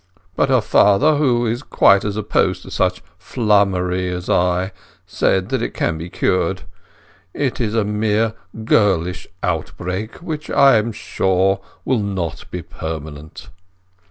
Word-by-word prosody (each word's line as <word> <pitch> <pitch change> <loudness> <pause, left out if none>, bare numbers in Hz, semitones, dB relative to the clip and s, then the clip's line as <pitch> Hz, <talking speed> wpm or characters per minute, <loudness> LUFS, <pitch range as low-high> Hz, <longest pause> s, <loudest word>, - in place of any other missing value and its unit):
But - - +1
her 130 -3 +4
father, 105 +10 +4
who 125 -5 +2
is 115 +2 -1
quite 100 -8 +4
as 105 0 -3
opposed 110 -1 0
to - - -11
such - - 0 0.2
flummery 95 -4 +1
as 90 0 -4
I, 90 +2 +1 0.3
says 95 - +1
that 130 -3 -2
can 80 -2 -1
be 85 +2 -6
cured. - - 0 0.7
It 135 -3 -1
is 110 -1 -1
a 110 - +2
mere 105 +1 0 0.3
girlish 90 -6 +1 0.2
outbreak 90 +5 -3
which, 155 -3 -6
I 135 -4 +5
am 110 +2 0
sure, 95 -2 0 0.3
will 130 -3 +1
not 95 -5 -4
be 90 -1 -6
permanent." 80 -1 -8
100 Hz, 135 wpm, -19 LUFS, 90-115 Hz, 0.7 s, I